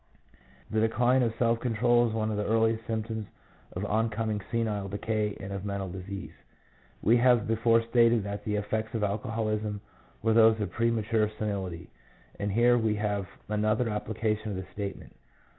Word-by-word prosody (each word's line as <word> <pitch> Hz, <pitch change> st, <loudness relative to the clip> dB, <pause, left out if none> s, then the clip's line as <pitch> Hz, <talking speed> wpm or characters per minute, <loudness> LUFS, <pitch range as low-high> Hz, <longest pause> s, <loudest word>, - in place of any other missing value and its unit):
The 110 Hz, -, +1 dB
decline 120 Hz, +3 st, +3 dB
of 115 Hz, -2 st, 0 dB
self 115 Hz, -1 st, +2 dB
control 120 Hz, 0 st, +3 dB
is -, -, -5 dB
one 110 Hz, 0 st, 0 dB
of 105 Hz, -, -2 dB
the 105 Hz, -, -1 dB
earliest 115 Hz, +1 st, +1 dB
symptoms 110 Hz, -1 st, -3 dB, 0.5 s
of 95 Hz, +3 st, -3 dB
on 110 Hz, +2 st, +1 dB
coming 110 Hz, -1 st, -2 dB
senile 110 Hz, -4 st, -1 dB
decay 105 Hz, +1 st, -2 dB
and 100 Hz, 0 st, -6 dB
of 100 Hz, -1 st, -4 dB
mental 100 Hz, -2 st, -3 dB
disease. 95 Hz, +2 st, -7 dB, 0.7 s
We 115 Hz, +2 st, +5 dB
have 120 Hz, -3 st, +4 dB
before 115 Hz, +1 st, +3 dB
stated 115 Hz, -1 st, +3 dB
that 100 Hz, 0 st, -5 dB
the 105 Hz, 0 st, -1 dB
effects 110 Hz, +2 st, -2 dB
of 110 Hz, -, -1 dB
alcoholism 105 Hz, 0 st, -1 dB, 0.4 s
were 115 Hz, 0 st, +3 dB
those 110 Hz, -1 st, +6 dB
of 105 Hz, -, -2 dB
premature 115 Hz, -2 st, +1 dB
senility, 95 Hz, -5 st, -4 dB, 0.5 s
and 100 Hz, 0 st, -1 dB
here 120 Hz, +3 st, +4 dB
we 110 Hz, -2 st, +1 dB
have 105 Hz, -2 st, -1 dB, 0.2 s
another 110 Hz, +2 st, +1 dB
application 110 Hz, 0 st, -2 dB
of 100 Hz, -, -3 dB
the 95 Hz, 0 st, -5 dB
statement. 100 Hz, -1 st, -6 dB
110 Hz, 165 wpm, -28 LUFS, 105-115 Hz, 0.7 s, those